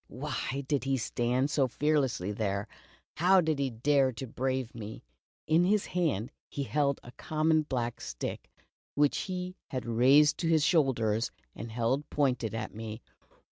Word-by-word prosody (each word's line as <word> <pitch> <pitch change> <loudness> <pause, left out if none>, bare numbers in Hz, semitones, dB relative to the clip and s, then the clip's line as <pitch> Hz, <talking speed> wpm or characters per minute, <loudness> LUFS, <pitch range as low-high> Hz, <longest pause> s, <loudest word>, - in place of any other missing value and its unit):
Why 135 +1 -4
did 140 -2 0
he 135 0 +1
stand 125 +4 0
so 135 -4 +2
fearlessly 135 -8 0
there? 100 -1 -2 0.5
How 185 +3 +5
did 160 -4 +1
he 140 -1 +1
dare 135 +3 +2
to 130 - -6
brave 130 0 -2
me? 110 -2 -8 0.4
In 160 +2 +4
his 205 +2 +2
hand 145 - -1 0.2
he 140 - -3
held 140 0 0
a 120 - -11
common 155 +4 +1
black 120 -5 -3
stick, - - -5 0.5
which 145 0 +3
he 185 0 -4
had 130 -3 -4
raised 130 +6 +5
to 170 - 0
his 160 -2 +4
shoulder 130 - +2 0.3
and 115 +2 -7
held 120 +5 -1
pointed 125 -6 0
at 110 -1 -4
me. 110 +1 -7
135 Hz, 155 wpm, -30 LUFS, 115-150 Hz, 0.5 s, How